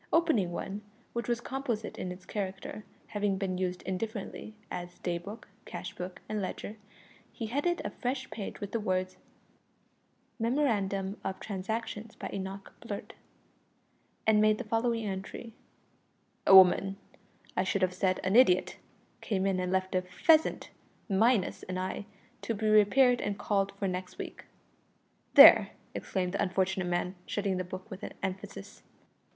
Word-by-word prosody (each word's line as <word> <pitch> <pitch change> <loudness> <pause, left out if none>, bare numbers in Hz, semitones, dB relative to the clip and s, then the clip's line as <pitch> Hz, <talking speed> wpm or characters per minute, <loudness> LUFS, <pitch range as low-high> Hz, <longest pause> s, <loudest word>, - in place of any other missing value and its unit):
Opening 280 - +3
one, 195 +4 -4 0.3
which 235 0 -3
was 240 -1 0
composite 250 -5 -3
in 180 - -3
its 180 +1 -10
character 195 +1 -5 0.3
having 205 -2 0
been 185 -2 -2
used 180 -1 -2
indifferently 215 +2 -5 0.2
as 175 0 -6
day 175 -1 -2
book, 205 +6 -9 0.2
cashbook, 180 +1 -7
and 215 -1 -2
ledger 205 +3 -5 0.5
he 230 - -5
headed 290 +10 0
a - - -2
fresh 260 +1 -3
page 205 - -6
with 205 - -5
the 230 - 0
words 185 -2 -1 1.2
"Memorandum 210 -6 0
of 190 - -3
Transactions 220 +2 -4
by - - -6
Enoch 195 0 -6
Blurt," - - -6 1.1
and 215 -1 +5
made 215 0 +4
the 250 - -4
following 230 0 0
entry: 200 +4 -5 0.9
"A 190 - +9
woman 190 +1 +7 0.6
I 185 - +2
should 190 0 0
have 185 0 +2
said 185 0 +1
an 185 +3 +1
idiot 185 -8 +5 0.4
came 195 -3 -1
in 195 -1 +1
and 180 0 -1
left 190 0 0
a 185 - +2
pheasant, 310 - +2 0.4
minus 220 +1 +2
an 185 0 -5
eye, 185 +2 -3 0.3
to 230 - -2
be 215 +1 -1
repaired 240 +4 +5
and 205 0 -2
called 200 -1 0
for 200 0 -2
next 180 0 -4
week." - - -7 0.9
"There!" - - +10 0.2
exclaimed 180 -2 -2
the 200 - 0
unfortunate 190 0 0
man, 175 +1 -1
shutting 200 -2 -1
the 185 - -1
book 185 +4 -8
with 190 - -8 0.2
emphasis. 195 +1 -6
195 Hz, 145 wpm, -30 LUFS, 185-220 Hz, 1.2 s, There